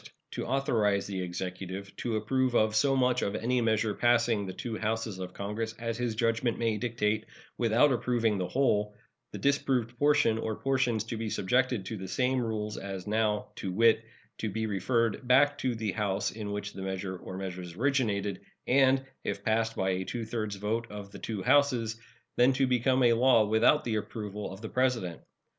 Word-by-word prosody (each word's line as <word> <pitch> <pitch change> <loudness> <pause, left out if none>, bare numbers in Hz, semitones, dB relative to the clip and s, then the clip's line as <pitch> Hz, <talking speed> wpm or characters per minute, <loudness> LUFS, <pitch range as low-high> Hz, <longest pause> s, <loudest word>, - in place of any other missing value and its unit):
To - - -4
authorize 115 -7 +1
the 95 -2 -4
Executive 95 +2 -5
to 115 -2 -2
approve 125 +3 0
of 110 -1 +3
so 135 +5 +3
much 125 -1 +2
of 100 - -1
any 125 +2 0
measure 110 -1 +1
passing 120 -3 +2
the - - -4
two 115 +4 -5
Houses 110 -2 -2
of 90 0 -6
Congress 110 +3 -4
as 115 -1 -3
his 120 -2 -1
judgment 115 +1 +1
may 115 -2 0
dictate, 110 -2 -1 0.3
without 120 +5 +4
approving 115 -4 +1
the 90 - -1
whole, 105 -6 +1 0.4
the - - -6
disapproved 130 -4 +1
portion 145 -6 +3
or 110 -1 -2
portions 130 -5 0
to 115 +1 -5
be 110 0 -3
subjected 125 +1 +1
to 110 +3 -5
the 95 -1 -6
same 125 +6 +1
rules 105 -2 -3
as 95 -2 -6
now, 105 0 0
to 95 - -3
wit, 115 +3 +4 0.4
to 110 - -2
be 110 +2 -2
referred 115 +4 0
back 145 +3 +4
to 125 -2 0
the 110 -2 -2
House 100 -3 -1
in 105 -2 -6
which 105 0 -4
the 95 - -8
measure 95 0 -3
or 95 +1 -8
measures 90 -2 -6
originated, 105 -6 0 0.2
and, 135 0 +4 0.2
if 100 0 -3
passed 115 +1 +1
by 95 0 0
a 95 0 -1
two 115 +4 -4
thirds 110 -2 -3
vote 110 +4 -2
of 105 -1 -8
the - - -10
two 105 -4 -4
Houses, 125 -5 +2 0.4
then 125 +2 +5
to 135 +1 +2
become 130 +1 +2
a 120 -1 +6
law 115 -2 +5
without 110 +8 +4
the 110 -2 -1
approval 105 -1 -5
of 95 +2 -9
the 110 - -6
President. 125 -9 0
110 Hz, 190 wpm, -29 LUFS, 100-125 Hz, 0.4 s, a